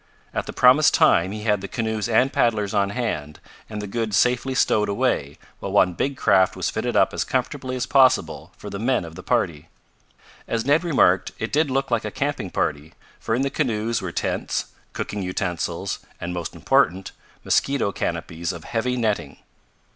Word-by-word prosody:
At - - -3
the - - -4
promised 130 +4 +5
time 85 +3 +4
he 105 0 -6
had 105 -3 +1
the 100 - -5
canoes 110 0 -2
and 125 +4 +3
paddlers 105 -4 +1
on 100 -1 +2
hand 75 -10 -3 0.3
and 105 -1 -5
the - - -3
goods 110 0 -1
safely 125 +1 +2
stowed 105 -4 +2
away 100 - 0 0.2
while - - -5
one 90 - +4
big 135 +10 -2
craft 95 -1 +3
was - - -2
fitted - - -2
up - - +3
as - - -1
comfortably 130 0 -2
as 125 -1 -1
possible 130 -2 +3
for - - -9
the 100 - -5
men 120 -3 +1
of 80 - -10
the - - -9
party. 80 0 -1 0.8
As 115 -1 -1
Ned 145 +5 +3
remarked, 95 - +3
it 110 - -4
did 150 0 +2
look 135 0 -1
like 115 -1 +1
a - - -3
camping 140 -8 -2
party, 75 -2 -2 0.2
for 115 - -1
in 130 - 0
the 140 - -1
canoes 115 -5 -1
were - - -4
tents, - - -2 0.2
cooking 105 - -4
utensils 90 0 -3 0.2
and, 85 +1 -4
most 85 -2 -5
important, 95 +3 +1 0.3
mosquito 135 -7 +1
canopies 85 -2 -3
of 85 -3 -9
heavy 125 +2 -1
netting. 110 -4 -1
110 Hz, 185 wpm, -23 LUFS, 95-125 Hz, 0.8 s, promised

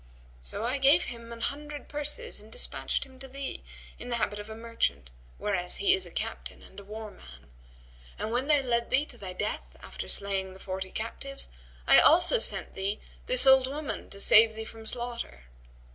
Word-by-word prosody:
So - - -1
I 255 +4 0
gave 280 +6 +6
him 235 -1 -8
an 230 0 -8
hundred 295 +2 -4
purses 295 +12 -3
and - - -16
despatched - - -2
him 260 -2 -15
to 270 - -8
thee, 275 +1 -6 0.4
in 245 - -8
the 240 - 0
habit 210 -3 -1
of 205 +1 -8
a 220 - -7
merchant, 230 - -2 0.3
whereas 180 -4 -1
he 395 -1 +4
is 380 -1 +1
a - - -11
captain - - -6
and - - -13
a - - -11
war 215 +1 -8
man; 65 - -16 0.7
and 220 - -4
when 250 +4 0
they 295 -2 +4
led 235 -2 0
thee 275 +3 +3
to 245 - -10
thy 185 -2 -6
death 210 +3 -4
after - - -8
slaying 195 -1 -1
the 190 - -14
forty 190 0 -5
captives, 250 +7 -4 0.4
I - - +8
also - - +5
sent - - -1
thee 195 +2 -2 0.3
this 255 +1 +9
old 265 -1 +7
woman 290 +2 -5
to 200 - -6
save 220 +2 +7
thee 220 0 -6
from 220 0 -11
slaughter." 235 - -5
235 Hz, 195 wpm, -29 LUFS, 205-270 Hz, 0.7 s, this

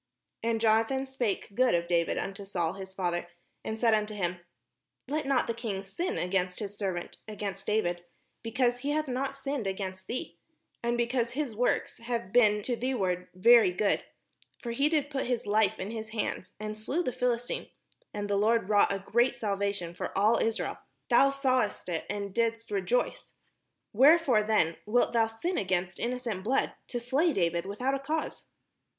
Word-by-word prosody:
And 230 -1 0
Jonathan 225 +4 +2
spake 240 -7 -2
good 250 -2 +3
of 170 0 0
David 170 -1 +1
imto 195 0 -4
Saul 175 -4 -1
his 190 0 -8
father, 175 -2 -2 0.4
and 220 0 -4
said 230 -1 +4
unto 215 0 0
him, 180 -3 -2 0.7
''Let 295 +1 -2
not 270 -2 +3
the 230 - -1
Idng 220 -4 -4
sin 345 - -3
against 180 0 0
his 205 -2 -5
servant, 190 -4 -3
against 205 -2 -5
David; 175 -5 0 0.4
because 240 +2 +1
he 285 +3 -1
hath 305 0 0
not 265 +2 -2
sinned 275 -5 -3
against 190 -1 -4
thee, 250 - -5 0.4
and 235 0 0
because 240 0 0
his 280 -3 -2
works 245 +3 0
have 230 -4 -4
been 210 -4 +5
to 245 - -1
thee 255 +3 -1
ward 180 -4 -1
very 230 +1 +7
good: 200 +3 +1 0.6
for 235 - -3
he 275 +5 +2
did 300 -2 0
put 270 -3 -2
his 245 -2 -1
life 210 0 +2
in 195 +3 -4
his 220 -1 -5
hand, 220 -4 -3
and 215 0 -5
slew 295 +11 -1
the 255 - -2
Philistine, 245 -1 -1 0.4
and 205 0 -4
the 200 0 +1
Lord 220 0 +2
wrought 205 -1 +5
a 195 -1 -3
great 240 +3 +3
salva 200 -2 0
tion 175 -4 -5
for 175 - -5
all 215 +4 +4
Israel: 225 0 -1 0.3
thou 270 +3 +6
sawest 255 -8 0
it, 165 -2 -2
and 200 -1 -3
didst 230 -1 -1
rejoice: 200 +5 -1 0.6
wherefore 270 -1 +6
then 210 -7 +2
wdlt 240 +3 +2
thou 225 -1 +4
sin 225 +12 -2
against 185 -1 -1
innocent 235 -5 -2
blood, 250 +6 +1
to 245 - -3
slay 275 +8 +2
David 170 - 0
without 250 +7 -1
a 275 - 0
cause?" 305 +3 -3
220 Hz, 180 wpm, -29 LUFS, 195-250 Hz, 0.7 s, very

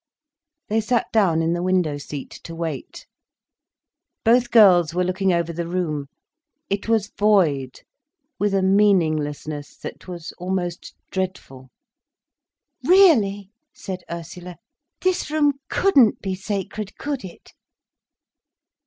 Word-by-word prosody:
They 220 +1 +1
sat 235 +2 +1
down 175 -7 +3
in 165 +1 +1
the 175 - -2
window 180 -5 0
seat, 145 -1 -7
to 165 - -7
wait. 160 -5 -6 1.2
Both 240 +2 +4
girls 175 -7 +6
were 180 - +2
looking 185 +1 0
over 170 -1 0
the 170 +1 -4
room. 160 -5 -2 0.6
It 200 +2 -2
was 220 -3 +1
void, 160 -11 +2 0.6
with 205 -1 +1
a 190 - +2
meaninglessness 155 -7 +1
that - - -9
was 175 -3 -7
almost 180 -1 -4 0.2
dreadful. 180 -9 -5 1.1
"Really," 220 - +4 0.2
said 185 -1 -7
Ursula, 170 +1 -8 0.5
"this 370 -4 0
room 290 -2 +1
couldn't 275 - +4
be 190 -2 -3
sacred, 200 +1 -5
could 285 -3 -4
it?" 185 -3 -12
185 Hz, 115 wpm, -22 LUFS, 165-210 Hz, 1.2 s, girls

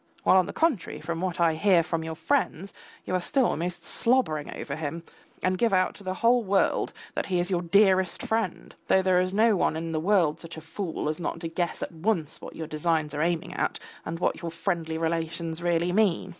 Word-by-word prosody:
While - - +5
on 185 - +3
the - - -4
contrary, 310 - 0
from 170 0 -4
what 185 -2 -2
I 165 -1 +4
hear 175 +1 +4
from 165 -1 -2
your 160 0 -5
friends, 200 - -1 0.3
you - - -4
are 185 - +1
still 265 - +2
almost 175 -1 -2
slobbering 230 - +1
over 140 - -5
him, 160 +2 -4 0.4
and 185 0 +1
give 230 -3 +2
out 185 -1 +3
to 200 - -13
the 185 -1 -3
whole 240 +3 +3
world 195 -1 +1 0.2
that - - -2
he 180 -2 +1
is 175 +2 -1
your 175 -2 +1
dearest 190 0 +3
friend, 200 -6 -2
though 190 - +4
there 185 -1 +4
is 185 0 -1
no 215 +2 +4
one 175 - +1
in 165 +1 -3
the 160 - -1
world 170 -3 +2
such 165 -1 -9
a - - -7
fool 160 0 -4
as 155 +2 -2
not 170 - -3
to 165 - -3
guess 170 +1 -2
at - - -5
once 165 -2 -2
what - - -9
your 160 - -5
designs 155 -1 -1
are 150 - -2
aiming 170 0 -1
at - - -1 0.3
and 165 - -4
what 175 - -1
your 170 - -3
friendly 165 -1 -2
relations 165 0 -2
really 175 0 +1
mean. 205 -4 +2
175 Hz, 225 wpm, -27 LUFS, 165-190 Hz, 0.4 s, While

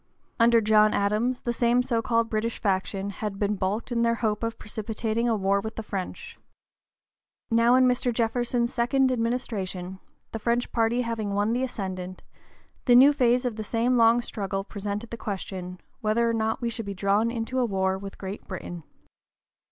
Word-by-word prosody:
Under 230 0 +5
John 215 0 +4
Adams 215 +5 0
the 240 - -2
same 240 +1 +2
so 235 -3 0
called 230 0 +1
British 225 +1 -2
faction 195 0 -1
had 205 0 -5
been 205 0 0
baulked 200 +6 -2
in 235 -1 +1
their 230 0 +2
hope 215 -2 -1
of 230 0 -3
precipitating 220 +2 -2
a 225 - +2
war 200 0 +1
with 220 +1 -6
the 225 - -5
French. 195 -3 -6 1.1
Now 230 +2 +5
in 255 0 +5
Mr. 250 0 +1
Jefferson's 240 +1 0
second 260 +2 +2
administration, 205 -7 -3 0.3
the 225 - -4
French 235 +2 0
party 230 +1 +1
having 220 -4 -3
won 205 +3 +1
the 245 - 0
ascendant, 185 -7 -5 0.6
the 245 - +6
new 275 +4 +8
phase 250 -2 +2
of 235 -3 -2
the 215 - -3
same 235 +3 +1
long 230 0 +5
struggle 195 -3 -3
presented 205 +2 -5
the 235 - -5
question, 185 -3 -5 0.2
whether 230 0 +1
or 230 - +1
not 220 +1 -1
we 235 -1 -1
should 225 -2 -5
be 200 - -4
drawn 200 +4 +2
into 235 +2 -2
a 250 - +3
war 190 -3 0
with 195 0 -8
Great 195 +1 -7
Britain. 175 -2 -6
225 Hz, 180 wpm, -26 LUFS, 200-235 Hz, 1.1 s, new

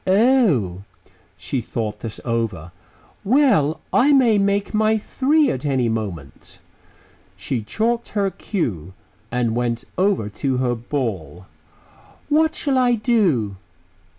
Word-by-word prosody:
"Oh!" 190 - +3 0.6
She 130 - -3
thought 110 -2 -4
this 115 -2 -6
over. 110 -8 -2 0.5
"Well, 205 - +3
I 270 +4 +4
may 240 -6 +4
make 200 +1 0
my 215 +1 +2
three 280 +7 +1
at 130 - -4
any 130 -5 +1
moment." 95 -11 -6 0.8
She 115 +5 -3
chalked 230 - -1
her 200 -1 +1
cue 95 - -4 0.4
and 120 -2 0
went 120 -1 -1 0.2
over 190 - +1
to 125 +6 -2
her 125 -1 0
ball. 115 - -4 0.8
"What 315 +1 +2
shall 275 -3 0
I 250 -1 +3
do?" 185 - +1
140 Hz, 120 wpm, -21 LUFS, -, 0.8 s, I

